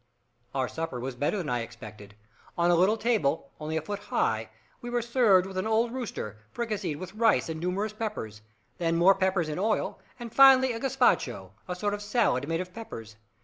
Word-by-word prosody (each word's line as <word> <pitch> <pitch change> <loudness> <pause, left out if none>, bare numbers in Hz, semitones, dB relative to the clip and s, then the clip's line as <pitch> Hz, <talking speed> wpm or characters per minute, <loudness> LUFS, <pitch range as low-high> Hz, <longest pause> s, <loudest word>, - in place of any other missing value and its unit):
Our 130 -1 +1
supper 160 -6 -4
was 130 +2 -4
better 145 +10 0
than 175 -6 -3
I 120 -1 0
expected. 110 -3 -10 0.4
On 170 0 +3
a - - +5
little 190 +6 +3
table, 165 -12 0
only 155 +1 -3
a 160 - -2
foot 205 +5 -4
high, - - -1 0.3
we 240 - -6
were 240 -1 0
served 230 -6 +4
with 190 0 -7
an 185 - -2
old 225 +1 +2
rooster, 210 - -5
fricasseed 210 -9 -3
with 185 +2 -8
rice 225 -5 +2
and 160 -1 -4
numerous 190 +5 -2
peppers, 210 - -5 0.4
then 165 -1 +1
more 180 +3 +6
peppers 190 -3 0
in 155 +2 -3
oil, 215 +2 0 0.2
and 235 -2 -8
finally 265 -2 +7
a 230 - -4
gaspacho 230 - +1 0.2
a 180 - -3
sort 205 +3 -1
of 205 - -4
salad 205 - +1
made 165 +1 0
of 180 0 -8
peppers. 115 - -9
185 Hz, 195 wpm, -28 LUFS, 150-220 Hz, 0.4 s, finally